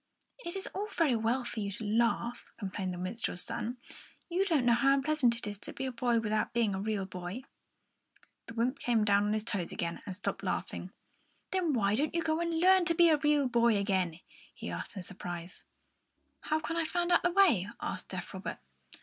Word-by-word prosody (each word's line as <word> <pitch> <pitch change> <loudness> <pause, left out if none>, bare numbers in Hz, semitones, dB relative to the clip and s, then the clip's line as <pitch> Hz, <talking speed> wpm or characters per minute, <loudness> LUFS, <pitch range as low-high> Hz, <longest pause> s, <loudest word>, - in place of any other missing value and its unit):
"It 345 -7 -5
is 385 - -3
all 405 +2 -2
very 330 - +2
well 230 +3 +1
for 235 - -5
you 200 -1 -2
to 220 - -6
laugh," 235 +2 +1
complained 190 -3 -3
the 180 - -5
minstrel's 185 0 -3
son. 240 +3 -3 0.5
"You 355 +3 +2
don't 315 -9 +2
know 240 - +6
how 275 +3 +4
unpleasant 275 -4 +2
it 230 - -2
is 205 -1 -4
to - - -8
be 265 - -4
a 260 - -2
boy 240 -1 +1
without 215 -1 0
being 225 -3 +2
a 190 - -2
real 205 -2 -1
boy." 185 +6 -6 1.0
The 225 - -9
wymp 250 +4 0
came 230 -5 +2
down 205 0 +4
on 210 - +1
his 215 -1 0
toes 195 -6 -2
again 170 0 -3
and 185 - -4
stopped 195 0 -3
laughing. 185 -1 -3 0.6
"Then 360 -5 +1
why 200 -5 +2
don't 290 +9 +1
you 335 - +1
go 315 0 +1
and 335 -1 0
learn 370 +1 +6
to 335 -1 +2
be 340 0 +6
a 310 - +5
real 295 -2 +3
boy?" 235 -1 +4 0.8
he - - -6
asked - - -5
in 190 - -5
surprise. 175 -2 -7 0.8
"How 310 0 +1
can 330 +1 -3
I 335 - +2
find 350 +2 0
out 350 - +5
the 355 - +2
way?" 345 - +4
asked - - -4
deaf - - -6
Robert. - - -5
235 Hz, 210 wpm, -31 LUFS, 205-315 Hz, 1.0 s, know